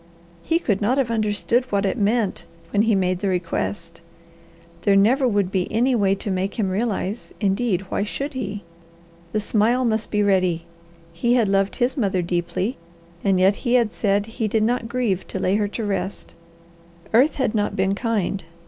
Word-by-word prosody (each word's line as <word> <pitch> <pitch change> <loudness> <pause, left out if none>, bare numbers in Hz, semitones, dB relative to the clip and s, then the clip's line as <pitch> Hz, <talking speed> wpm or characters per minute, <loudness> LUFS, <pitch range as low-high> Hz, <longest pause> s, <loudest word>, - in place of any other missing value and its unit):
He 330 - +1
could 215 - -1
not 240 +6 +2
have 255 -4 +1
understood 215 +1 +1
what 200 0 +1
it 195 - 0
meant 215 -1 0 0.2
when 205 - +3
he 220 -1 +3
made 185 -1 +1
the 200 - -1
request. 170 -1 -3 0.8
There 200 - +3
never 250 +7 +4
would 205 -5 +1
be 185 -2 -1
any 245 +4 +2
way 200 -4 +2
to 200 +1 -4
make 190 +1 -2
him 200 -4 0
realize; 210 +1 -2
indeed, 200 -1 +1
why - - 0
should 275 +8 -4
he? 210 -6 -4 0.7
The 215 - 0
smile 225 +4 +2
must 220 -1 0
be 210 -1 +1
ready. 185 -4 +1 0.5
He 235 +9 +1
had 235 -4 +3
loved 195 0 +1
his 255 +1 0
mother 190 -7 +1
deeply, 175 +6 -2 0.5
and 195 -2 +2
yet 195 +2 +4
he 245 -1 0
had 235 -4 +3
said 200 -1 +1
he 225 0 -3
did 215 +1 +1
not 230 0 0
grieve 230 -7 -1
to - - -4
lay 185 - +1
her 210 -1 +1
to 215 +2 -4
rest. 195 -1 -4 0.8
Earth 260 +7 +4
had 260 -5 0
not 210 -2 0
been 190 +1 +1
kind. 200 -3 -1
205 Hz, 185 wpm, -22 LUFS, 190-235 Hz, 0.8 s, never